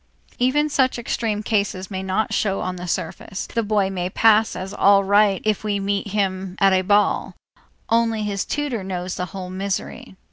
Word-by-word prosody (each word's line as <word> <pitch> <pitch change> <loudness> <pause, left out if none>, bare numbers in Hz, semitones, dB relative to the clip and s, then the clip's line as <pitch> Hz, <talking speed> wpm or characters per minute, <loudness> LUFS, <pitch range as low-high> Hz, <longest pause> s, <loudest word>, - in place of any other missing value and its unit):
Even 275 +5 +2
such 265 -4 +1
extreme 225 -3 -2
cases 200 -3 -1
may 190 -1 -3
not 190 +3 -1
show 195 -2 0
on 185 0 -3
the 180 0 -7
surface. 185 +2 -4
The 230 - -2
boy 205 -3 +1
may 180 -1 -2
pass 220 +2 +4
as 190 +2 -6
all 200 -1 +5
right 200 0 +3
if 215 -1 0
we 205 -1 -1
meet 200 +1 -1
him 190 -2 -2
at 195 -1 +5
a 185 - +3
ball; 205 +2 +1 0.5
only 230 -1 +1
his 200 -2 -2
tutor 285 -8 -3
knows 180 -1 -4
the 180 - -3
whole 185 +1 -7
misery. 190 0 -4
200 Hz, 180 wpm, -22 LUFS, 190-215 Hz, 0.5 s, all